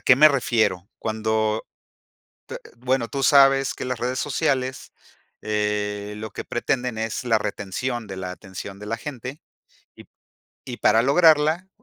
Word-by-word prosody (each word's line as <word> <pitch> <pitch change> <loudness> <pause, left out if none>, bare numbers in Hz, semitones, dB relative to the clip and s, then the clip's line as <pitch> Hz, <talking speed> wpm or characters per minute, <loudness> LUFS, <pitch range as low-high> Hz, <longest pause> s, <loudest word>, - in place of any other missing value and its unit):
qué 130 - +5
me 155 +2 +8
refiero? 110 -9 0
Cuando, 110 0 -1 0.8
te - - -6 0.2
bueno, 125 -1 0
tú 140 -1 -3
sabes 135 -1 +5
que - - -6
las 125 -2 -3
redes 125 +2 -2
sociales, 130 -3 -1 0.5
eh, 105 -1 -2
lo 110 0 -7
que - - -6
pretenden 125 -1 -2
es 110 +3 -3
la 115 -2 +3
retención 105 +4 -4
de 95 - -7
la 90 -1 -5
atención 95 +2 -9
de 105 - -9
la 115 +1 -2
gente, 130 +2 -7 0.5
y - - -13 0.6
y 125 -2 -6
para 110 - +4
lograrla, 155 +4 +4
120 Hz, 145 wpm, -23 LUFS, 105-135 Hz, 0.8 s, me